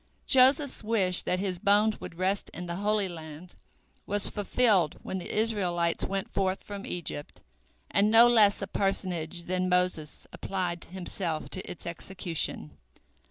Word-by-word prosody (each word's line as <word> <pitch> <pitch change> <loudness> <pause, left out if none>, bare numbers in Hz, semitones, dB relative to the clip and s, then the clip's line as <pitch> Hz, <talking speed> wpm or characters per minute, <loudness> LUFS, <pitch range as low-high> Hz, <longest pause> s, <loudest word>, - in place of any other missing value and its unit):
Joseph's 270 +1 +4
wish, 200 -5 +3
that 180 - -1
his 185 -2 -2
bones 210 +2 +3
should - - -8
rest 190 +2 -1
in 175 - -6
the 170 0 -5
Holy 205 0 0
Land, 160 0 -10 0.5
was 205 0 +3
fulfilled 205 -5 +1
when 190 - -4
the 175 - -7
Israelites 180 -6 0
went 195 0 -2
forth 190 -1 -1
from 200 -1 -8
Egypt, 165 -4 -6 0.5
and 205 +1 +3
no 230 +2 +8
less 210 -4 +4
a - - -4
personage 180 -4 -2
than 185 +1 -1
Moses 180 -4 -1
applied 180 -3 -4
himself 175 -3 -4
to - - -4
its 175 - -8
execution. 170 - -2
185 Hz, 145 wpm, -28 LUFS, 175-205 Hz, 0.5 s, no